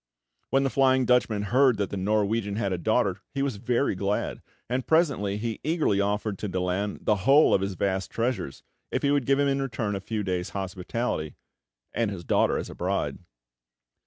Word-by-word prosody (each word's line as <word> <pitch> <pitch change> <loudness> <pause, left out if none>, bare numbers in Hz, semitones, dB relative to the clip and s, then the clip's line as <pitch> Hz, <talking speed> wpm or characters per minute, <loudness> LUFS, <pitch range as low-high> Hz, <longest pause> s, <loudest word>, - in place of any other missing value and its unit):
When 135 0 +3
the 135 - 0
Flying 130 -1 +3
Dutchman 115 -4 +2
heard 125 +2 +3
that 100 -1 -2
the - - -3
Norwegian 105 +1 0
had 100 -3 -1
a 90 - -2
daughter, 100 -2 +1
he 135 - 0
was 135 -7 -2
very 120 +5 0
glad; 100 +2 -2 0.3
and 125 +1 -2
presently 135 - +2
he 115 0 -3
eagerly 150 - +1
offered 105 0 -1
to 105 - -3
Daland 95 +2 -2
the 105 - +3
whole 135 +10 +5
of 95 - +3
his 95 -1 -2
vast 95 +1 -1
treasures, 115 - -2 0.3
if - - -2
he 140 - +3
would 145 -3 +1
give 135 0 +4
him 145 0 +2
in 135 0 +1
return 110 -6 -2
a 95 - -4
few 110 +1 -3
days' 90 -2 -2
hospitality, 95 - -3 0.6
and 115 -3 0
his 95 -4 -6
daughter - - +2
as - - -4
a - - -8
bride. - - -2
105 Hz, 190 wpm, -26 LUFS, 100-130 Hz, 0.6 s, whole